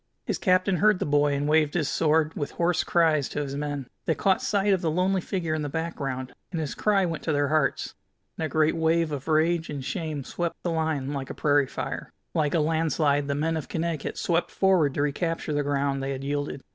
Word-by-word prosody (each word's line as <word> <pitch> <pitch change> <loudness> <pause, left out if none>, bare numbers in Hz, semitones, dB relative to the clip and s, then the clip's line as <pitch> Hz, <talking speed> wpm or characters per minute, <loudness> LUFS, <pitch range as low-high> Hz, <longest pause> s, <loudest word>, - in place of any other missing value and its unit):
His - - -2
captain 185 0 +3
heard 210 +2 +4
the - - -2
boy, 145 0 +3
and 145 +1 -1
waved 155 0 +3
his 155 -5 +1
sword 160 0 +2
with 145 -2 -4
hoarse 170 0 +1
cries 160 -5 +2
to 150 - -2
his 140 -1 -5
men. 145 -2 -3 0.2
They 160 - +2
caught 190 +5 +2
sight 200 -1 +2
of 185 - +1
the 165 - 0
lonely 185 +4 +1
little 180 - -5
figure 170 -5 -1
in 155 - -1
the 145 - -3
background, 135 -5 -4 0.2
and 170 - -2
his 155 -3 -3
cry 200 -3 +2
went 165 -3 -3
to 160 - +1
their 145 -1 +1
hearts, 150 -3 0 0.4
and - - -4
a 155 - -1
great 155 0 +2
wave 165 0 +2
of 140 -3 -5
rage 160 +1 +2
and 140 -3 -5
shame 155 -5 -3
swept 170 +5 -3
the 175 - -1
line 155 -4 -1
like 135 -2 -4
a - - -6
prairie 145 -2 +3
fire. - - -5 0.2
Like 155 -1 +1
a - - +3
landslide 155 -2 +1
the 140 - -1
men 160 +3 0
of 160 - -4
Connecticut 165 -3 -2
swept 170 0 0
forward 180 -8 +2
to 145 - +1
recapture 160 +2 -1
the 145 - +1
ground 140 -1 0
they 135 0 -2
had 135 0 -6
yielded. 145 -1 -3
155 Hz, 230 wpm, -26 LUFS, 145-170 Hz, 0.4 s, heard